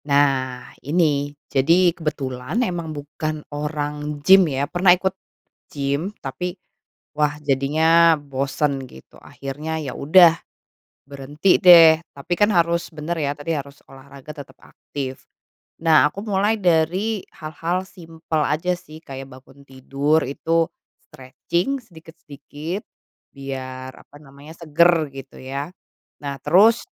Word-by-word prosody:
Nah 135 -3 0
ini, 145 -2 +1 0.2
jadi 170 +6 +3
kebetulan 140 - -4
emang 175 -5 -4
bukan 155 +1 -5
orang 150 0 -4
gim 190 -3 +7
ya. 135 0 -1
Pernah 180 +3 +4
ikut 190 +1 -1 0.6
gim 140 +5 -2
tapi 180 +7 -5 0.6
wah 150 -1 0
jadinya 160 +4 +4
bosen 140 0 -2
gitu, 65 - -17
akhirnya 150 +4 -6
ya 140 -4 -5
udah 165 +5 +6 0.8
berhenti 145 +6 0
deh, 165 -3 +8 0.2
tapi 150 +5 -3
kan 205 +3 +3
harus 170 -2 +1
bener 155 +3 -4
ya, 140 -2 0
tadi 145 +3 -5
harus 140 0 -7
olahraga 135 +2 -12
tetap 135 -2 -11
aktif. 135 -2 -8 0.6
Nah, 160 -2 +5
aku 200 +7 -8
mulai 205 +1 +1
dari 185 +4 +1
hal-hal 170 +2 -3
simpel 165 -3 -5
aja 165 +4 -1
sih, 155 -3 -14
kayak 135 0 -8
bangun 130 +2 -16
tidur 140 +4 0
itu 165 +5 0 0.4
stretching 170 - -3
sedikit-sedikit 160 0 -9 0.5
biar, 130 -1 -7
apa - - -20
namanya, 140 +2 -14
seger 165 -1 +3
gitu 135 -1 -11
ya. 140 +4 -5 0.5
Nah 140 -1 -4
terus 205 +9 +5
150 Hz, 120 wpm, -21 LUFS, 140-170 Hz, 0.8 s, deh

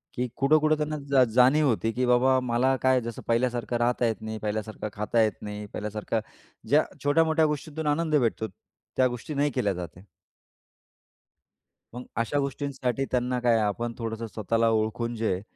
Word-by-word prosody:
की 125 +1 -1
कुठं-कुठं 155 +2 +4
त्यांना 150 0 -2
जा 130 -2 +6
जाणीव 130 +5 +5
होती 115 -2 +1
की 125 +2 0
बाबा 125 +2 +4
मला 125 +1 +1
काय 130 -1 +3
जसं 115 -1 -6
पहिल्यासारखं 120 0 0
राहता 120 +1 +1
येत 110 - -3
नाही, 110 0 -5
पहिल्यासारखं 110 0 -4
खाता 105 +2 +1
येत 110 - -2
नाही, 105 0 -6
पहिल्यासारखं 105 +1 -3 0.5
ज्या - - +5 0.2
छोट्या-मोठ्या 160 +2 +3
गोष्टीतून 150 +1 -3
आनंद 155 +1 +1
भेटतो 115 -5 +1
त्या 130 +3 -3
गोष्टी 125 +5 -6
नाही 145 +1 +1
केल्या 100 -5 0
जात 90 -1 -5
आहे. 90 - -15 1.9
मग 125 - -6
अशा 115 +5 0
गोष्टींसाठी 135 -1 -2
त्यांना 125 0 0
काय 120 -2 +3
आपण 115 +3 -1
थोडंसं 115 -1 -4
स्वतःला 115 +2 0
ओळखून 110 +2 -1
जे 110 -2 0
आहे, 90 - -4
120 Hz, 160 wpm, -27 LUFS, 110-135 Hz, 1.9 s, जा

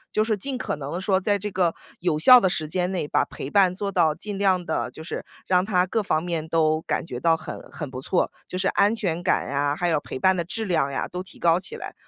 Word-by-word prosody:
就 215 - +4
是 220 -1 0
尽 260 +6 -3
可 250 - -3
能 140 +1 -6
地 175 - -3
说 190 -1 +2
在 205 +1 +1
这 210 +1 -5
个 180 -3 +1 0.2
有 170 -3 0
效 250 +11 +9
的 195 - +2
时 155 -3 -2
间 180 +2 0
内 180 - -1
把 - - +1
陪 135 - -7
伴 185 +1 +4
做 200 +1 -3
到 155 -5 +2
尽 200 +4 -6
量 185 -3 +2
地 160 - -1
就 160 - -11
是， 160 - -6 0.2
让 180 0 +2
她 185 -3 +2
各 220 +4 -1
方 160 -6 0
面 165 -3 -2
都 155 -1 +2
感 - - -2
觉 125 -7 -6
到 165 +3 +3
很 160 - -7
很 150 -4 -7
不 130 - -6
错， 175 - 0 0.2
就 185 - -5
是 190 +1 +1
安 205 +3 +3
全 180 -7 -2
感 180 - +1
呀， 145 +1 0
还 175 - 0
有 160 -3 +2
陪 - - -7
伴 190 +8 +4
的 - - +1
质 220 +6 -4
量 170 -8 +1
呀 140 - -2
都 180 - -5
提 185 -1 -12
高 170 0 +3
起 190 - -6
来。 - - -7
180 Hz, 290 characters per minute, -24 LUFS, 160-195 Hz, 0.2 s, 效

